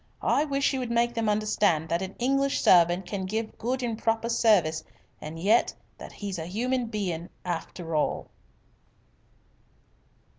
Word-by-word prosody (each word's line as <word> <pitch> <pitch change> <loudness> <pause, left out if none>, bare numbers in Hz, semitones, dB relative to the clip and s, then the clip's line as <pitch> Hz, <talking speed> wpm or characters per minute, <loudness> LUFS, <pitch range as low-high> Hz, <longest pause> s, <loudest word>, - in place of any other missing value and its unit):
I 295 - +2
wish 280 -1 +1
you 265 - -1
would 250 -2 -3
make 235 0 +1
them 225 -2 0
understand 210 -6 +1
that 170 +2 0
an 190 0 -5
English 275 +2 +1
servant 175 +1 +5
can 190 +1 -4
give 220 +2 -3
good 255 +3 -2
and 235 -2 -1
proper 225 +1 0
service 195 -9 +3 0.4
and 155 +2 -7
yet 205 +8 +2 0.2
that - - -9
he's 200 -4 -5
a 160 - -5
human 245 +6 -1
bein' 185 -6 -3 0.2
I - - -5
after 165 -1 -5
all." 150 - 0
210 Hz, 155 wpm, -27 LUFS, 175-235 Hz, 0.4 s, servant